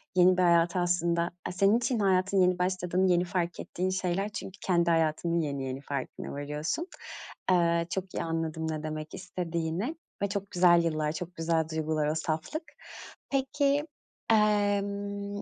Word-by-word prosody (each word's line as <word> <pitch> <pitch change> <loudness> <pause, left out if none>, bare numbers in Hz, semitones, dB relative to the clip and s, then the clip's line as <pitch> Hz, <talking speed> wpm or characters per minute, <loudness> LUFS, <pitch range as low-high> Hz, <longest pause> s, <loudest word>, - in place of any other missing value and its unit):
yeni 180 0 +6
bir - - +3
hayata 170 +1 +4
aslında 175 -1 +1 0.2
aaa, - - -2
senin 195 +4 +4
için 235 0 0
hayatın 190 -1 +3
yeni 180 0 +3
başladığını 185 0 +1
yeni 175 0 +3
fark 175 -1 -2
ettiğin 185 +1 -2
şeyler 185 +2 -1
çünkü 205 -1 -7
kendi 170 -2 +2
hayatının 165 +1 +1
yeni 140 -3 -2
yeni 130 +1 -4
farkına 140 -2 -5
varıyorsun. 150 - -3 0.6
Eee, 170 -1 +3
çok 190 +1 -4
iyi - - -1
anladım 160 -1 -2
ne 155 -1 -4
demek 155 0 -5
istediğini 175 - -3 0.3
ve 200 - +1
çok 200 0 -4
güzel 175 -1 +5
yıllar, 155 -2 0
çok 175 +3 -6
güzel 165 0 +1
duygular 155 -1 0
o 155 - 0
saflık. 160 - -2 0.7
Peki, 280 +1 +1 0.5
emm, 205 -1 +1
175 Hz, 150 wpm, -29 LUFS, 160-195 Hz, 0.7 s, yeni